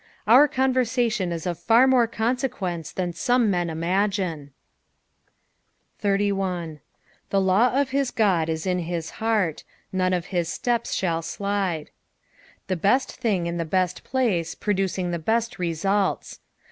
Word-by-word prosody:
Our 255 Hz, +7 st, +7 dB
conversation 245 Hz, -7 st, +1 dB
is 165 Hz, -2 st, -4 dB
of 175 Hz, -2 st, -3 dB
far 230 Hz, +8 st, +5 dB
more 255 Hz, -3 st, +4 dB
consequence 220 Hz, -, -2 dB
than 180 Hz, -2 st, -3 dB
some 245 Hz, +2 st, +2 dB
men 175 Hz, -2 st, 0 dB
imagine. 175 Hz, -2 st, -1 dB, 1.5 s
81. 195 Hz, -5 st, -1 dB, 0.2 s
" -, -, -36 dB
The 195 Hz, -, +2 dB
law 210 Hz, +8 st, +3 dB
of 280 Hz, -2 st, 0 dB
hit 275 Hz, -2 st, 0 dB
God 185 Hz, -7 st, +2 dB
it 160 Hz, +1 st, -3 dB
in 180 Hz, -3 st, -1 dB
ku 170 Hz, -1 st, -2 dB, 0.2 s
heart; 215 Hz, -8 st, 0 dB, 0.3 s
none 185 Hz, -1 st, +1 dB
of 175 Hz, -1 st, -1 dB
hit 175 Hz, -2 st, 0 dB
itept 235 Hz, +6 st, -1 dB
sAoU 165 Hz, -3 st, -2 dB
lUde." 195 Hz, -6 st, -1 dB, 0.8 s
The 185 Hz, -, -1 dB
best 205 Hz, +10 st, +2 dB
thing 195 Hz, -7 st, 0 dB
in 170 Hz, 0 st, -3 dB
the 170 Hz, -, -1 dB
best 180 Hz, +1 st, -1 dB
place, 215 Hz, -11 st, 0 dB
producing 190 Hz, -3 st, -1 dB
the 170 Hz, -, -2 dB
best 230 Hz, +7 st, -1 dB
results. 190 Hz, +3 st, -1 dB
190 Hz, 140 wpm, -24 LUFS, 170-230 Hz, 1.5 s, Our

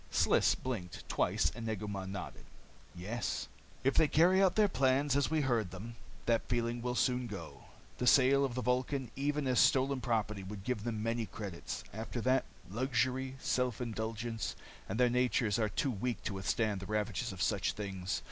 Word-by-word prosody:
Sliss -, -, +3 dB
blinked, 105 Hz, -10 st, -5 dB
twice, -, -, +1 dB
and 115 Hz, -, -7 dB
Negu 105 Hz, -1 st, -3 dB
Mah 95 Hz, -2 st, -4 dB
nodded. 95 Hz, 0 st, -6 dB, 0.5 s
"Yes," 105 Hz, +7 st, -3 dB
he -, -, -26 dB, 0.2 s
said. -, -, +1 dB
"If -, -, -2 dB
they 155 Hz, -, +5 dB
carry 175 Hz, +6 st, +5 dB
out 190 Hz, -2 st, +4 dB
their 215 Hz, -1 st, +5 dB
plans 135 Hz, -3 st, +2 dB
as 140 Hz, -1 st, +2 dB
we 160 Hz, 0 st, +2 dB
heard 120 Hz, -8 st, +1 dB
them, 105 Hz, +6 st, -8 dB, 0.3 s
that 115 Hz, -1 st, +1 dB
feeling 120 Hz, 0 st, 0 dB
will 125 Hz, 0 st, -2 dB
soon 125 Hz, -1 st, +1 dB
go. 105 Hz, -3 st, -8 dB, 0.3 s
The 125 Hz, -, 0 dB
sale 140 Hz, +1 st, +6 dB
of 130 Hz, -3 st, -1 dB
the 125 Hz, -, -2 dB
Vulcan, 125 Hz, 0 st, 0 dB
even 145 Hz, +1 st, 0 dB
as 125 Hz, -2 st, +2 dB
stolen 135 Hz, 0 st, +4 dB
property, 110 Hz, -4 st, -1 dB
would 95 Hz, +1 st, -7 dB
give 110 Hz, -2 st, -2 dB
them 110 Hz, -3 st, -2 dB
many 115 Hz, -1 st, -1 dB
credits. 100 Hz, -6 st, -6 dB
After 110 Hz, +3 st, -4 dB
that 130 Hz, +2 st, +2 dB, 0.2 s
luxury, 130 Hz, +4 st, 0 dB
self 125 Hz, -3 st, 0 dB
indulgence. 115 Hz, -1 st, -3 dB, 0.3 s
And 105 Hz, +5 st, -2 dB
their 125 Hz, -, +6 dB
natures 120 Hz, -3 st, +2 dB
are 110 Hz, -1 st, +1 dB
too 135 Hz, +7 st, 0 dB
weak 120 Hz, +2 st, -3 dB
to 100 Hz, -, -2 dB
withstand 100 Hz, +2 st, 0 dB
the 95 Hz, -, -8 dB
ravages 105 Hz, +2 st, -1 dB
of 95 Hz, -, -9 dB
such 100 Hz, -2 st, +1 dB
things. 95 Hz, -3 st, -3 dB
120 Hz, 185 wpm, -33 LUFS, 105-130 Hz, 0.5 s, sale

